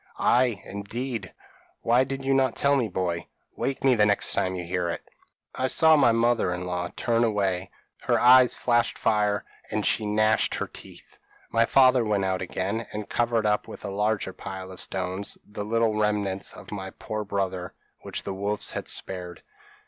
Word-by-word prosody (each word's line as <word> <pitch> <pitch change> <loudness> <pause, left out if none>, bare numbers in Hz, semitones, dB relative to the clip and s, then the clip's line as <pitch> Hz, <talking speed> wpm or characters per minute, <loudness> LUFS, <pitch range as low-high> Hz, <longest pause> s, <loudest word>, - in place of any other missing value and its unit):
p> - - -36
"'Ay, 120 -4 +2
indeed! 110 +2 -5 0.5
Why 120 +2 +4
did 135 0 -5
you 135 - +2
not 135 -1 +2
tell 140 0 +3
me, 125 -5 +1
boy? 90 -3 -2 0.3
Wake 135 -1 -3
me 135 -1 +5
the 110 -3 +3
next 105 - +2
time 95 0 0
you 90 - -4
hear 90 0 -1
it.' 85 - -5 0.5
"I 130 - -1
saw 160 +4 +5
my 135 -6 +5
mother 115 -3 +2
in 90 0 -3
law 90 -1 -3
turn 115 0 +1
away; 100 -4 0 0.4
her - - +3
eyes 125 0 +6
flashed 120 -1 +1
fire, 105 -2 +1 0.2
and - - -1
she 105 - +2
gnashed 110 +1 +2
her - - -2
teeth. - - -13 0.3
"My 115 0 +4
father 130 -1 +5
went 105 -3 0
out 95 -1 -1
again, 100 +5 -3
and 105 -1 -5
covered 115 -2 +1
up 105 0 +1
with - - -9
a 100 - -4
larger 105 -1 -1
pile 95 0 -7
of 95 - -10
stones 95 +1 -3
the 105 0 -6
little 115 0 +1
remnants 105 -2 0
of - - -12
my 95 -2 -5
poor 110 +2 -5
brother 95 -3 -3 0.2
which - - -6
the 100 - -4
wolves 100 +2 -2
had - - -5
spared. 90 -3 -4
105 Hz, 185 wpm, -26 LUFS, 95-120 Hz, 0.5 s, eyes